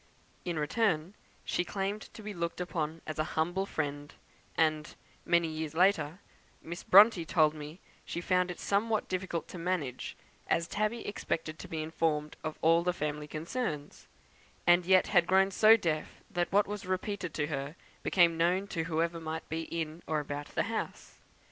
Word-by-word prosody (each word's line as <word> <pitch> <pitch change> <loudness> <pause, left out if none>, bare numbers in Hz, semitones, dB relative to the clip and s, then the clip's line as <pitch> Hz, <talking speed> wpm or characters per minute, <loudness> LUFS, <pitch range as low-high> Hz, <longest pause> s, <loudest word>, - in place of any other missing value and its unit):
In 175 -3 -2
return, 165 +2 +1 0.3
she - - 0
claimed 200 +3 -3
to 215 - -9
be 210 0 -5
looked 170 -1 -3
upon 165 -3 -3
as 155 -1 -5
a - - +3
humble 175 +5 +1
friend; 145 -2 -3 0.5
and, 155 -1 +1 0.3
many 170 -1 +3
years 155 -1 -4
later, 170 -3 +3 0.4
Miss 170 +2 -7
Bronte 200 -2 +7
told 155 -2 +3
me 150 0 -7
that 175 - -20 0.3
she - - -2
found 180 0 +1
it 180 - -6
somewhat 215 +2 +1
difficult 185 -2 -3
to 180 - -7
manage, 165 -8 -2 0.3
as 170 0 +1
Tabby 215 +4 -1
expected 155 -5 -3
to - - -8
be 160 -1 -3
informed 155 -1 -1
of 155 - -4
all 165 +1 +5
the 180 +1 0
family 150 -2 -3
concerns, 155 - -4 0.6
and 175 0 +5
yet 185 -1 +6
had 175 -4 +4
grown 190 +1 +4
so 220 +3 +7
deaf 160 -7 -3
that 175 -1 -1
what 205 +1 +4
was 205 -2 -6
repeated 185 -1 -2
to 150 - 0
her 145 0 -4 0.3
became 170 -3 +4
known 180 +4 +2
to 165 -1 -2
whoever 165 0 0
might 160 0 -5
be 160 +1 -3
in 165 0 -4
or 155 -1 +1
about 145 0 -5
the - - +2
house. 225 +1 -5
170 Hz, 175 wpm, -31 LUFS, 155-185 Hz, 0.6 s, Bronte